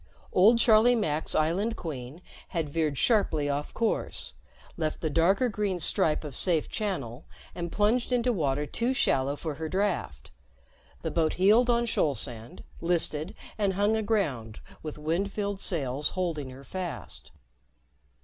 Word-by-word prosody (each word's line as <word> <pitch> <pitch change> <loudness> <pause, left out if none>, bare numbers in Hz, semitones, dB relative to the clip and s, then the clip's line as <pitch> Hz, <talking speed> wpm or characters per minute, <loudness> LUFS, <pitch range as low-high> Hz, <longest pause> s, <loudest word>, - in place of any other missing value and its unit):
Old 215 +6 +6
Charlie 230 +1 +5
Mack's 160 -9 -1
Island 190 +9 +1
Queen 145 +1 -7 0.2
had 165 -5 -2
veered 155 -3 0
sharply 160 - +2
off 145 +1 -2
course, 230 -1 -1 0.4
left 155 -2 -2
the 155 - -2
darker 190 - +3
green 205 -4 -1
stripe 155 -1 +1
of 145 -4 -7
safe 165 -1 +2
channel 145 - -4 0.3
and 170 -1 -5
plunged 225 +5 +1
into 245 0 +2
water 145 -5 0
too 235 - -1
shallow 140 - +1
for 155 +1 -4
her 160 +2 -5
draft. 185 - -2 0.7
The - - -2
boat 160 -2 +1
heeled 215 +7 +4
on 235 0 +3
shoal 150 - +1
sand, 115 -1 -4 0.2
listed 165 -1 0 0.2
and 200 -2 +2
hung 205 +3 +2
aground 190 - -1 0.2
with 155 -1 -6
wind 165 +6 -1
filled 200 -1 -3
sails 145 -6 -1
holding 165 -7 -2
her 130 +1 -11
fast. 140 - -6
170 Hz, 145 wpm, -28 LUFS, 145-205 Hz, 0.7 s, Old